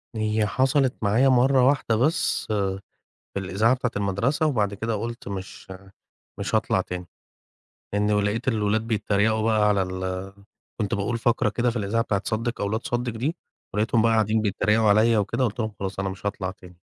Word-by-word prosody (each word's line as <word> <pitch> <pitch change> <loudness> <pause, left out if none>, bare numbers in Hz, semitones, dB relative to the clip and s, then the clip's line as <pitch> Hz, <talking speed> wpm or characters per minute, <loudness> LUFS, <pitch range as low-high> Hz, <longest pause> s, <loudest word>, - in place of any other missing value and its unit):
هي 110 0 +1
حصلت 130 +3 +2
معايا 110 +6 +3
مرّه 130 0 +4
واحدة 135 -5 +2
بس 150 +9 +1
في 100 -2 0 0.7
الإذاعة 100 +6 +2
بتاعة 125 -1 -2
المدرسة، 105 - 0
وبعد 105 -9 +1
كده 110 +3 -2
قُلت 115 +2 -5
مش 95 -1 -7 0.7
مش - - -3
هاطلع - - +2
تاني. 90 -1 -5 0.9
لإن 105 0 +2
لقيت 105 +4 -1
الولاد 110 -2 +1
بيتريقوا 110 0 +1
بقى 110 -2 +3
على 100 -2 +2
ال 95 +1 -4 0.5
كنت 105 -3 -1
باقول 100 +4 -1
فقرة 115 -1 +1
كده 120 +3 0
في 120 - -5
الإذاعة 105 +3 0
بتاعة 100 -3 -1
صدِّق 115 +1 -2
أو 100 - 0
لا 110 - 0
تصدِّق 120 +1 -2
دي، 135 +9 -2 0.4
ولقيتهم 110 +2 +2
بقى 115 +1 +3
قاعدين 110 0 +2
بيتريقوا 105 +1 +2
عليَّ 110 +2 +4
وكده، 105 +5 0
قُلت 120 +1 -1
لهم 110 -1 -2
خلاص 95 0 -4
أنا 95 0 -1
مش 95 +1 -9
هاطلع 100 -2 -2
تاني. 90 -2 -16
110 Hz, 175 wpm, -24 LUFS, 100-120 Hz, 0.9 s, مرّه